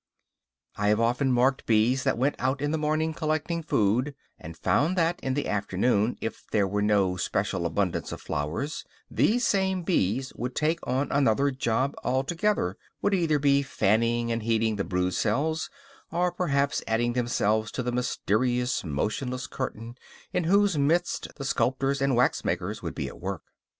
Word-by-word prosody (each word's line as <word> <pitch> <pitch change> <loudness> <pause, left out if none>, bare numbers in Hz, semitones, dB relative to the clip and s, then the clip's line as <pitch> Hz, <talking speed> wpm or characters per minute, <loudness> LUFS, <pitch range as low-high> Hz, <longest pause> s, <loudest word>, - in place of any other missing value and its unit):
I 105 - 0
have 105 +1 +3
often 125 +3 +2
marked 130 +2 +2
bees 115 +4 +3
that - - +1
went 135 +4 +1
out 130 +2 0
in 145 +1 -1
the 160 - 0
morning 155 +1 0
collecting 155 +1 -1
food; 125 0 +1 0.2
and 80 +2 -9
found 165 - +1
that, 170 0 +1
in 130 -1 -2
the 145 - -1
afternoon, 105 +3 +1
if 115 - -5
there 100 -2 +2
was 105 +2 -1
no 100 -3 +2
special 85 -1 -1
abundance 90 +2 -1
of - - -6
flowers, 80 - -3 0.3
these 240 +3 +2
same 190 -2 +1
bees 130 - 0
would 125 +1 -5
take 160 +2 +1
on 130 +3 0
another 140 0 +3
job 130 +1 0
altogether; 135 - 0 0.3
would 205 - +2
either 165 -5 +2
be 140 0 +3
fanning 115 -1 +1
and 115 0 -1
heating 110 -1 +1
the 100 - 0
brood 90 -1 -1
cells, 145 - 0 0.4
or 175 +1 +1
perhaps 140 -5 0
adding 120 +2 +1
themselves 110 -3 0
to 125 - -2
the 125 - -1
mysterious, 125 +1 0
motionless 115 - -2
curtain 120 -3 -5 0.4
in 180 - 0
whose 200 -2 +3
midst 170 +5 +1
the 140 - -6
sculptors 135 +1 0
and 140 -1 +2
waxmakers 125 +1 0
would - - -5
be - - -3
at - - -10
work. - - -4
130 Hz, 165 wpm, -27 LUFS, 110-150 Hz, 0.4 s, have